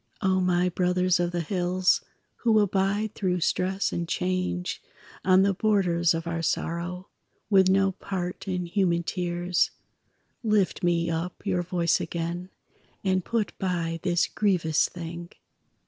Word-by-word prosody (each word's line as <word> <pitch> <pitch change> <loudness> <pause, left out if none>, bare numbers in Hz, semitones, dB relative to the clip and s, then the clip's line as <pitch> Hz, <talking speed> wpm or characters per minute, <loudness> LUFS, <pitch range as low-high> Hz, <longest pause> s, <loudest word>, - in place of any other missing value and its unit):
O 190 -1 +3
my 180 0 +2
brothers 180 0 +1
of 175 0 +1
the 175 -1 -1
hills, 180 +2 +1 0.4
Who 225 -2 +3
abide 205 +1 +1
through 180 -3 -1
stress 190 +4 0
and 170 -1 -2
change, 180 0 -2 0.4
On 185 0 +5
the 200 0 +3
borders 180 -5 +2
of 165 0 -4
our 170 0 -2
sorrow, 175 +3 -2 0.4
With 190 -2 +6
no 195 0 +3
part 180 0 -5
in 180 -2 -1
human 170 -1 +1
tears, 175 0 0 0.7
Lift 210 -5 +1
me 170 -2 +1
up 165 +5 -4
your 185 -3 +1
voice 175 -1 +1
again 170 +2 -4 0.5
And 190 -2 +1
put 230 0 -1
by 170 -3 -1
this 175 -2 +2
grievous 175 -7 +1
thing! 170 0 -7
180 Hz, 135 wpm, -26 LUFS, 175-190 Hz, 0.7 s, With